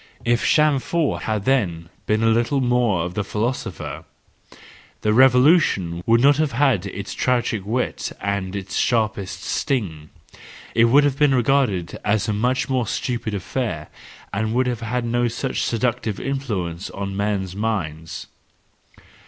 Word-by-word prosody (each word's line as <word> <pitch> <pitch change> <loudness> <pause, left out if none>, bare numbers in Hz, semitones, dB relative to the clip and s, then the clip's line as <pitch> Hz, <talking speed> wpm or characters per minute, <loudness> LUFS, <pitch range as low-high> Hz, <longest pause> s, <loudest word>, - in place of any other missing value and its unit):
—If 120 0 +2
Chamfort 150 +1 +2
had 105 -2 -2
then 90 -11 0 0.2
been 110 +1 +1
a 115 - +4
little 120 +5 +1
more 120 -8 +1
of 90 - -5
the 105 - -1
philosopher, 115 +6 -3 1.0
the 105 - +2
Revolution 125 - +4
would 115 +1 +4
not 140 +1 +5
have 155 -5 0
had 120 -8 +2
its 100 +1 -6
tragic 120 -5 0
wit 120 +5 -2
and 100 -1 -2
its 95 -1 -5
sharpest 110 -5 0
sting; 80 - -2 0.6
it 115 0 +5
would 140 +5 +5
have 140 -2 0
been 145 -3 +4
regarded 120 -9 +1
as 105 -1 +1
a 105 - 0
much 125 +5 0
more 130 -4 0
stupid 120 -4 -2
affair, 95 -6 -3 0.4
and 110 +2 -1
would 130 +1 +2
have 125 -3 -2
had 120 +2 -2
no 120 +1 +1
such 115 - -2
seductive 115 -2 -1
influence 105 -11 -3
on 100 0 -5
men's 100 -2 -2
minds. 80 -8 -3
115 Hz, 145 wpm, -22 LUFS, 100-125 Hz, 1.0 s, not